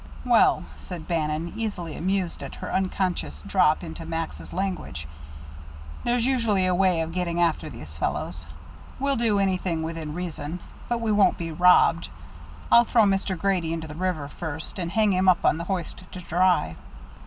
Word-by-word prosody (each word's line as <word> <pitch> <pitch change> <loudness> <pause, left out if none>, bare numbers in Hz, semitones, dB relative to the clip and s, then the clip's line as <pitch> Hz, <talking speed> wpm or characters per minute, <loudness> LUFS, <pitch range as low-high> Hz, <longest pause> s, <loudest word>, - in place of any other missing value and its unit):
"Well," - - +4
said 175 -4 -8
Bannon, 160 0 -1
easily, 200 -8 -4
amused 185 0 -1
at - - -7
her - - -6
unconscious 185 - -1
drop - - +3
into 80 - -7
Max's 165 0 -5
language, 185 - -3 1.0
"there's 240 -1 +1
usually 230 -8 +2
a 185 - +2
way 180 -2 +3
of 160 0 -3
getting 175 -1 -1
after 165 -2 +1
these 75 - -9
fellows. - - -3 0.5
We'll 275 +1 +1
do 225 -4 +2
anything 185 -4 0
within 160 -2 -5
reason, 170 -2 -5 0.3
but 240 -1 0
we 225 -1 0
won't 205 -1 +4
be 165 -1 -4
robbed. 180 +3 +4 0.6
I'll 235 - +8
throw 230 -1 +4
Mr. 195 -2 +1
Grady 175 -2 0
into 160 -1 -4
the 150 - -8
river 170 -3 -2
first, 160 +4 -6
and 170 -2 -2
hang 215 0 +3
him 185 +1 +4
up 180 - +3
on - - +4
the 170 - -4
hoist 185 -1 -4
to 185 - -6
dry." 175 - +2
180 Hz, 165 wpm, -25 LUFS, 160-195 Hz, 1.0 s, I'll